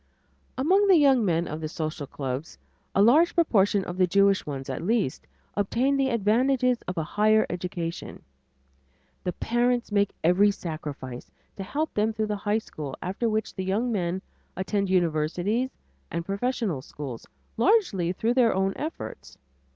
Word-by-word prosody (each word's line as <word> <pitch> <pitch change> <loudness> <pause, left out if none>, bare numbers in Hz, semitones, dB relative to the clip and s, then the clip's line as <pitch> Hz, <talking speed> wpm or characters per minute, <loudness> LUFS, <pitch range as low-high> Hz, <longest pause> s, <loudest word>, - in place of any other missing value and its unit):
Among 375 +10 +3
the 385 - +7
young 270 -5 +5
men 170 -3 +1
of 155 +2 -5
the 155 - -2
social 155 -3 -4
clubs 135 +2 -5 0.4
a 200 - +5
large 305 +10 +5
proportion 205 - +3
of 175 - -6
the 185 - +4
Jewish 200 0 +3
ones 135 -2 -5
at 130 - -4
least 205 - -1 0.3
obtain 235 +7 +1
the 270 -1 +2
advantages 245 +3 +2
of 180 - -4
a 160 - 0
higher 215 +6 +3
education. 175 -1 -5 1.0
The 180 - -1
parents 240 +2 0
make 200 -1 +1
every 180 +5 +5
sacrifice 150 -9 -6 0.3
to - - -7
help 300 +11 -2
them 215 +1 +1
through 220 0 -1
the - - -1
high 205 +1 0
school 150 -10 -6
after 195 +6 -2
which 220 0 -1
the 190 - -4
young 210 +6 0
men 185 -2 -1 0.3
attend 195 +1 -1
universities 180 +7 +1 0.4
and 170 0 -3
professional 200 - -1
schools, 130 -4 -8 0.3
largely 230 - +2
through 220 +6 0
their 245 -5 +3
own 195 0 +1
efforts. 310 +2 -6
200 Hz, 155 wpm, -26 LUFS, 170-235 Hz, 1.0 s, the